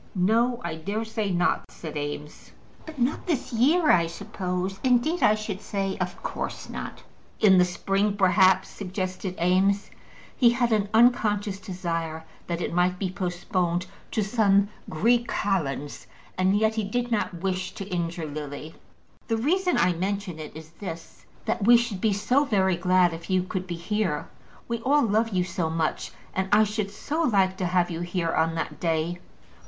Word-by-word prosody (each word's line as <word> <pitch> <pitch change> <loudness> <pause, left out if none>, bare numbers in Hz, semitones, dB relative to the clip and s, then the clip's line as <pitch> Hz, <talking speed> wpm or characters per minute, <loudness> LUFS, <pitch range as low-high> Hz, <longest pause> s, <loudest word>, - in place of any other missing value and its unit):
"No; 230 +6 +2
I 160 - -4
dare 205 +7 -3
say 220 -2 -2
not," 175 -1 +1
said 155 -2 -8
Eames. 145 0 -6 0.3
"But 315 -2 -9
not 255 +8 -1
this 295 -8 -1
year, 300 +8 +4
I 170 -2 +4
suppose. 180 +2 -4
Indeed, 260 +7 +2
I 215 - +5
should 215 -2 -5
say, 195 -2 -2
of 180 0 -4
course - - -4
not." - - -7 0.4
"In 190 -3 +6
the 180 - +6
spring, 195 +3 0
perhaps," 190 -1 +4
suggested 185 -1 -4
Eames. 190 +3 +2 0.4
He 240 - +5
had 240 0 +1
an 205 -2 +1
unconscious 215 -4 +3
desire 165 -4 -4 0.2
that 170 0 -2
it - - -2
might 180 +1 +2
be 185 -1 -2
postponed 180 -1 -1 0.2
to 215 - 0
some 200 -2 +3 0.2
Greek 235 +9 +2
kalends, 145 -8 -2 0.3
and 190 +2 +2
yet 220 +1 +2
he 220 -1 -1
did 240 +4 -2
not 210 -4 0
wish 185 -1 -1
to 195 - -6
injure 170 -3 -2
Lily. 150 +1 -6 0.5
"The 225 - +1
reason 360 +9 +1
I 180 - +3
mention 190 -1 -3
it 155 -1 -8
is 160 0 -10
this, 170 -5 -8 0.2
that 200 - -1
we 240 0 +9
should 230 -5 -2
be 220 - +3
so 210 +8 +2
very 190 -8 +2
glad 180 0 +3
if 165 +2 -9
you 185 -1 +2
could 185 0 -4
be 175 - -3
here. 170 -3 -1 0.4
We 235 0 -2
all 285 +5 +3
love 225 +1 +2
you 185 -4 +1
so 175 -2 -2
much, 160 -1 -1 0.2
and 190 0 -1
I 210 +1 +6
should 210 -1 -2
so 290 +10 -3
like 195 - +3
to 185 - -1
have 180 0 +1
you 165 - -4
here 175 -1 -1
on 165 0 +1
that 165 - -4
day." 165 +1 -1
190 Hz, 175 wpm, -26 LUFS, 175-215 Hz, 0.5 s, we